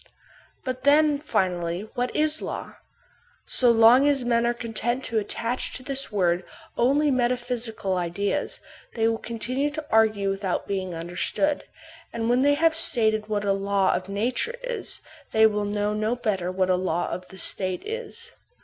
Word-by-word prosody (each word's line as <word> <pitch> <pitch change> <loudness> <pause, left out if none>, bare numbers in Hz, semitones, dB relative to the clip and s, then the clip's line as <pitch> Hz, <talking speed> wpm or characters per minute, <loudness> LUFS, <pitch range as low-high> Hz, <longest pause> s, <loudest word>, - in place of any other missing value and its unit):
But 255 0 -4
then, 295 0 +4
finally, 180 - -1
what 245 0 -2
is 310 0 +2
a - - -4
law? - - -6 0.7
So 250 - +3
long 235 +4 +6
as 275 -4 +2
men 235 0 +2
are 240 - +2
content 240 +2 -2
to 225 -3 0
attach 230 +4 -3
to 255 - -3
this 275 -1 -3
word 180 -3 +1 0.3
only 280 +4 +3
metaphysical 240 -5 -1
ideas, 200 +10 -2 0.4
they 225 -1 +2
will 225 0 0
continue 250 +5 -2
to 300 +1 -6
argue 215 -3 +3
without 195 -1 -2
being 190 -3 -3
understood; 180 - -1 0.5
and 230 0 -1
when 250 +1 +3
they 285 +1 +4
have 325 +2 +3
stated 220 -8 +2
what 205 -1 -1
a 200 - +3
law 195 -1 +1
of 185 +1 -3
nature 240 - -1
is, - - -3 0.3
they 220 0 +6
will 210 -1 +2
know 205 0 -1
no 215 +3 0
better 195 -7 -1
what 185 0 +1
a - - +4
law 180 -2 -1
of 180 0 -5
the 190 - -13
State 185 -1 -1
is. 465 +1 -6
225 Hz, 165 wpm, -25 LUFS, 195-260 Hz, 0.7 s, long